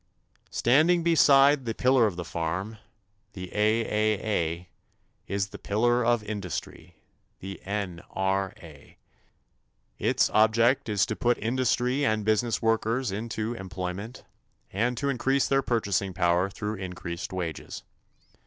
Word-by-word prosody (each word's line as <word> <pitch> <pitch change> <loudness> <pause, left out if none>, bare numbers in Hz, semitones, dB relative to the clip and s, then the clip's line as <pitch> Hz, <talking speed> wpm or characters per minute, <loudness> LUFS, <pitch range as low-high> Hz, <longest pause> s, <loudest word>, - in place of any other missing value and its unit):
Standing 160 +8 +3
beside 145 -4 +5
the 115 -1 -3
pillar 125 -3 +4
of 100 - -4
the 90 -1 -5
farm 85 +7 -4 0.5
the 90 -2 -8
A.A.A. 105 -5 0 0.6
is 100 0 -2
the - - -10
pillar 120 +4 +1
of 120 -2 +2
industry 100 -6 -6 0.4
the 95 0 -8
N.R.A. 95 -4 -4 1.0
Its - - +2
object 115 +3 +3
is 105 -2 +2
to 110 - -3
put 120 +2 +1
industry 125 +3 0
and 110 -5 +1
business 110 +2 +1
workers 115 +1 +1
into 110 +2 -3
employment 95 +3 -6 0.5
and 120 +5 0
to 140 - -2
increase 135 0 +1
their 135 0 +2
purchasing 100 -6 -1
power 90 +1 +2
through 105 +1 -4
increased 90 -2 -6
wages. 85 -5 -5
110 Hz, 115 wpm, -27 LUFS, 95-120 Hz, 1.0 s, beside